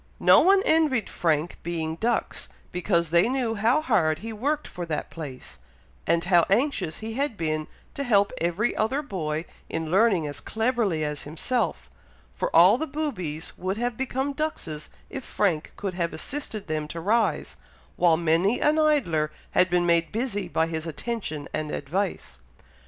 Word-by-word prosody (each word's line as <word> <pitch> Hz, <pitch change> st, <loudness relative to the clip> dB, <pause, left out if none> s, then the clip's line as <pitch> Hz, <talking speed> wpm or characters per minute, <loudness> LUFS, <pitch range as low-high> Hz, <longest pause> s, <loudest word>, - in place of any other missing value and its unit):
No -, -, +7 dB
one 390 Hz, +2 st, +5 dB
envied 305 Hz, -8 st, +2 dB
Frank 160 Hz, 0 st, 0 dB
being 160 Hz, -2 st, -3 dB
dux, 230 Hz, +7 st, -1 dB, 0.2 s
because 170 Hz, -3 st, 0 dB
they 170 Hz, +6 st, +4 dB
knew 250 Hz, -3 st, 0 dB
how 225 Hz, +7 st, +2 dB
hard 175 Hz, -, +2 dB
he 225 Hz, +5 st, -6 dB
worked 290 Hz, +8 st, -1 dB
for 180 Hz, -, -6 dB
that 155 Hz, -2 st, -3 dB
place, 130 Hz, -, -8 dB, 0.5 s
and 170 Hz, 0 st, +2 dB
how 175 Hz, -2 st, +5 dB
anxious 200 Hz, -, 0 dB
he 220 Hz, +1 st, -5 dB
had 270 Hz, -3 st, -1 dB
been 155 Hz, -1 st, -1 dB, 0.3 s
to 280 Hz, -, -3 dB
help 205 Hz, -6 st, +3 dB
every 175 Hz, +7 st, 0 dB
other 265 Hz, +7 st, 0 dB
boy 160 Hz, -, -3 dB, 0.2 s
in 160 Hz, -1 st, -3 dB
learning 195 Hz, -4 st, +4 dB
as 145 Hz, -1 st, -5 dB
cleverly 220 Hz, -8 st, 0 dB
as 150 Hz, -1 st, -3 dB
himself; 160 Hz, -, -2 dB, 0.5 s
for 65 Hz, -, -2 dB
all 185 Hz, +8 st, +7 dB
the 315 Hz, -, -2 dB
boobies 185 Hz, -, -3 dB
would 190 Hz, +2 st, -2 dB
have 240 Hz, 0 st, -1 dB
become 265 Hz, +2 st, -2 dB
duxes 270 Hz, -, -4 dB, 0.2 s
if 270 Hz, -, -5 dB
Frank 175 Hz, -10 st, 0 dB
could 195 Hz, -2 st, -3 dB
have 170 Hz, -2 st, -2 dB
assisted 220 Hz, -, -5 dB
them 155 Hz, -2 st, -2 dB
to 165 Hz, -, -6 dB
rise, 215 Hz, +6 st, +1 dB, 0.4 s
while 170 Hz, -2 st, +4 dB
many 170 Hz, +7 st, +2 dB
an 305 Hz, +1 st, +3 dB
idler 180 Hz, -, +2 dB, 0.2 s
had 180 Hz, 0 st, +3 dB
been 175 Hz, 0 st, +2 dB
made 170 Hz, -1 st, +2 dB
busy 215 Hz, -4 st, -2 dB
by 160 Hz, -2 st, +1 dB
his 160 Hz, 0 st, -4 dB
attention 160 Hz, -4 st, -4 dB
and 155 Hz, -1 st, -2 dB
advice. 175 Hz, +9 st, -3 dB
185 Hz, 165 wpm, -26 LUFS, 160-240 Hz, 0.5 s, No